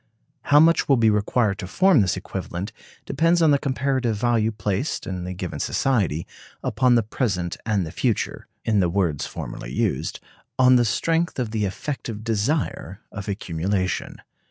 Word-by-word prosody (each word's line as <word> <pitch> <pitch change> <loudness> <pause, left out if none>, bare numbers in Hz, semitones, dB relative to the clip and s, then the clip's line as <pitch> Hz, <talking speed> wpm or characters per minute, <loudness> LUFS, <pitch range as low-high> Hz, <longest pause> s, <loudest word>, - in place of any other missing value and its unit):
How 145 - +6
much 165 0 +4
will 135 - +5
be 110 -2 +4
required 105 0 +1
to 95 - -5
form 185 - +4
this 95 -3 +1
equivalent 95 +4 -5 0.3
depends 165 +2 +2
on 160 -3 +5
the 140 - +4
comparative 130 -4 0
value 115 0 +1
placed, 105 +5 -2
in 90 -2 -4
the 90 - -4
given 90 -1 -5
society, 100 - 0 0.4
upon 120 +3 +3
the 115 - +3
present 100 - -2
and 100 -5 +1
the 80 - -7
future - - -1 0.2
(in 110 -2 +2
the 90 -3 +2
words 85 -6 0
formerly - - -7
used): - - -1 0.4
on 130 0 +6
the 120 -1 +4
strength 165 +9 0
of 120 -4 -2
the 110 -2 0
effective 110 +1 -5
desire 115 - -1
of 105 0 -6
accumulation. 95 0 -2
110 Hz, 160 wpm, -23 LUFS, 95-130 Hz, 0.4 s, How